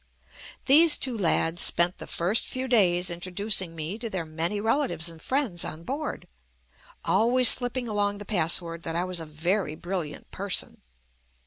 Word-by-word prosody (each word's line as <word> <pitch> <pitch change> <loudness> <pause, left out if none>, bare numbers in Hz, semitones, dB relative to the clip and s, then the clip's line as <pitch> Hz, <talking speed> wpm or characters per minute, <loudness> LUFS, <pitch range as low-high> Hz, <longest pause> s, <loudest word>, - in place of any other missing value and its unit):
These 305 +3 +6
two 255 -3 +1
lads 170 -4 0
spent 175 +1 +2
the - - -8
first 185 +7 +1
few 260 0 -4
days 185 -7 +3
in 170 - -5
troducing 185 -1 -1
me 165 +7 -5
to 230 -1 -5
their 185 -5 -4
many 165 +6 -2
relatives 210 - 0
and 165 -1 -11
friends 255 -11 -1
on 160 +2 -7
board, 285 - -5 0.8
always 245 +2 +4
slipping 245 0 +1
along 205 -1 -1
the 205 - -9
password 170 -3 0
that 165 -1 -5
I 175 - 0
was 185 -1 -5
a 165 - -7
very 160 +2 -2
brilliant 175 -4 -6
person. 195 -1 -1
185 Hz, 160 wpm, -26 LUFS, 170-230 Hz, 0.8 s, These